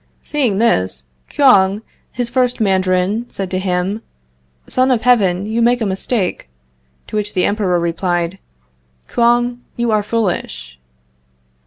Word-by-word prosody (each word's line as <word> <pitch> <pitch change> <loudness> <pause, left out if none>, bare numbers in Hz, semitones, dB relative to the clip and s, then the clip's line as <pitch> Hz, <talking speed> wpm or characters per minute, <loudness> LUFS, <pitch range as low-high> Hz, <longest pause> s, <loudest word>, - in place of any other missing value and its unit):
Seeing 260 -10 0
this, 90 - +1 0.3
Kouang, 205 -7 +4 0.3
his 245 -1 -2
first 250 0 0
Mandarin, 190 +2 +1
said 195 -2 -5
to 185 - 0
him: 185 +3 -1 0.6
"Son 255 +1 +1
of 245 -4 +1
Heaven, 200 -7 +3
you 220 +2 -1
make 240 +1 +3
a 225 - -1
mistake." 190 - -2 0.6
To - - -8
which 205 0 -3
the 180 - +2
Emperor 195 -4 +1
replied: 175 +1 -1 0.7
"Kouang, 240 +1 +2 0.2
you 235 -1 0
are 215 -1 +3
foolish." 185 - -3
205 Hz, 130 wpm, -17 LUFS, 185-235 Hz, 0.7 s, Kouang